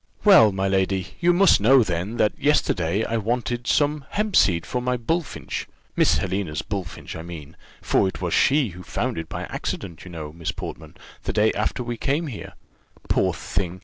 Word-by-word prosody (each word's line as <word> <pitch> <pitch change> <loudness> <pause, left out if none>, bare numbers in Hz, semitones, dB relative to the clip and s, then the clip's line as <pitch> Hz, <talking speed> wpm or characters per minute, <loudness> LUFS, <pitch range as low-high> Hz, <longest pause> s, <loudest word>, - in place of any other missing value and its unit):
"Well, 190 - +8
my 95 0 -1
lady, 95 -1 0
you 175 +1 +4
must 185 - +5
know, 130 +4 +6
then, 95 +4 -3
that 105 - +2
yesterday 100 - +1
I 115 - -1
wanted 120 +2 -2
some 145 -1 +1
hempseed 95 - +2
for 125 +10 -2
my 125 0 0
bullfinch 160 +6 -3 0.3
Miss - - +4
Helena's 95 -5 -2
bullfinch, 95 -4 -6
I - - -6
mean; 80 -4 -9 0.3
for - - +2
it 95 - -5
was 90 -3 -2
she 135 -6 +3
found 90 -2 -3
it 80 0 -7
by - - -5
accident, 85 -5 -5
you 90 - -10
know, 80 -3 -7
Miss 85 -1 -3
Portman, - - -8 0.3
the - - -2
day 110 +1 +3
after 110 +4 -1
we 120 -1 -4
came 145 +8 0
here. 130 -9 -7 0.6
Poor - - +2
thing! 90 -1 -4
100 Hz, 180 wpm, -23 LUFS, 90-125 Hz, 0.6 s, Well